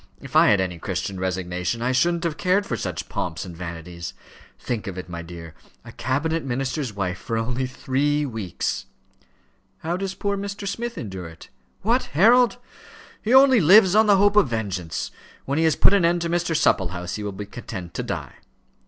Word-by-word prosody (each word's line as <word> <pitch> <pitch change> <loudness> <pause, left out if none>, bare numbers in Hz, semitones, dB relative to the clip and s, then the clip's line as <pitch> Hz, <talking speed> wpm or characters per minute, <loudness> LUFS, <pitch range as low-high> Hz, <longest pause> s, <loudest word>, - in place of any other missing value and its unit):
If - - -11
I - - +7
had 100 - +5
any 90 -2 -2
Christian 95 +2 -3
resignation, 90 +2 -2
I 125 - +1
shouldn't 170 +7 +2
have 165 -3 -1
cared 185 +5 +1
for 125 - -2
such - - -4
pomps 90 +1 -4
and 90 -2 -9
vanities. 85 0 -7 0.4
Think 115 -5 -4
of 95 -2 -5
it, 90 - -6
my 85 -1 -6
dear; 85 -1 -10 0.3
a - - -9
cabinet 160 +6 -1
minister's 135 0 -2
wife 95 -3 -3
for 115 - -3
only 125 +3 -1
three 145 +3 0
weeks!" 110 - -3 0.9
"How 170 +3 -2
does 190 0 -4
poor 200 0 -1
Mr. 200 0 -5
Smith 235 +4 -4
endure 95 -6 -6
it?" 80 0 -13 0.3
"What? 235 +5 +2
Harold? 240 +6 +5 0.6
He 220 - -2
only 265 -1 +7
lives 190 +3 +7
on 215 +1 +5
the 200 -1 +6
hope 205 +1 +4
of 210 -8 +5
vengeance. 100 - -3 0.3
When 140 +3 0
he 165 - +3
has 160 - +3
put - - +5
an 200 -3 +4
end 170 +1 +2
to 170 0 -2
Mr. 175 -2 +1
Supplehouse, 90 0 0
he - - -6
will 105 - -3
be 100 +1 -7
content 95 -5 -8
to - - -3
die." - - -5
130 Hz, 190 wpm, -23 LUFS, -, 0.9 s, I